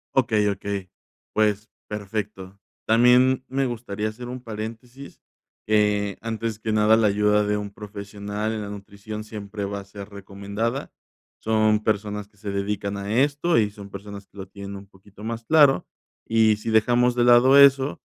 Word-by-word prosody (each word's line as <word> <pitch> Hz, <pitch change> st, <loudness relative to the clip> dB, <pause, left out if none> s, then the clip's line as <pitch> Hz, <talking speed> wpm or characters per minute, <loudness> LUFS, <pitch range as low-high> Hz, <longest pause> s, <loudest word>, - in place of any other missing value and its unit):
Okey 110 Hz, -5 st, +2 dB
okey, 100 Hz, -1 st, -4 dB, 0.4 s
pues, 105 Hz, 0 st, +1 dB, 0.2 s
perfecto. 100 Hz, -2 st, -5 dB, 0.3 s
También 125 Hz, +3 st, +4 dB
me 135 Hz, +1 st, 0 dB
gustaría 110 Hz, -3 st, -3 dB
hacer 120 Hz, +3 st, -9 dB
un 125 Hz, +1 st, -6 dB
paréntesis, 115 Hz, +5 st, -8 dB, 0.5 s
eh, 105 Hz, -1 st, +2 dB
antes 115 Hz, -1 st, -4 dB
que 110 Hz, 0 st, -2 dB
nada, 110 Hz, +1 st, +5 dB
la 110 Hz, -1 st, +3 dB
ayuda 105 Hz, +1 st, +2 dB
de 105 Hz, 0 st, 0 dB
un 105 Hz, -1 st, -4 dB
profesional 105 Hz, +1 st, -5 dB
en 110 Hz, -1 st, -3 dB
la 105 Hz, -, -5 dB
nutrición 100 Hz, +1 st, -8 dB
siempre 105 Hz, -1 st, -7 dB
va 100 Hz, 0 st, -3 dB
a 100 Hz, -, -10 dB
ser 100 Hz, 0 st, -10 dB
recomendada, 100 Hz, +5 st, -4 dB, 0.5 s
son 110 Hz, -1 st, +2 dB
personas 105 Hz, -1 st, -2 dB
que 105 Hz, -, -33 dB
se 100 Hz, 0 st, -6 dB
dedican 100 Hz, 0 st, -2 dB
a 100 Hz, +4 st, -1 dB
esto 145 Hz, +4 st, +1 dB
y 105 Hz, -2 st, +3 dB
son 100 Hz, -1 st, -11 dB
personas 100 Hz, 0 st, -9 dB
que 100 Hz, -, -22 dB
lo 95 Hz, -, -7 dB
tienen 100 Hz, 0 st, -8 dB
un 100 Hz, 0 st, -10 dB
poquito 100 Hz, +1 st, -17 dB
más 115 Hz, +1 st, -5 dB
claro. 145 Hz, -1 st, +4 dB, 0.4 s
Y 110 Hz, -1 st, +3 dB
si 110 Hz, +1 st, -4 dB
dejamos 120 Hz, +2 st, +3 dB
de 120 Hz, -, +2 dB
lado 120 Hz, +3 st, +6 dB
eso, 135 Hz, -8 st, +5 dB
105 Hz, 165 wpm, -24 LUFS, 100-115 Hz, 0.5 s, lado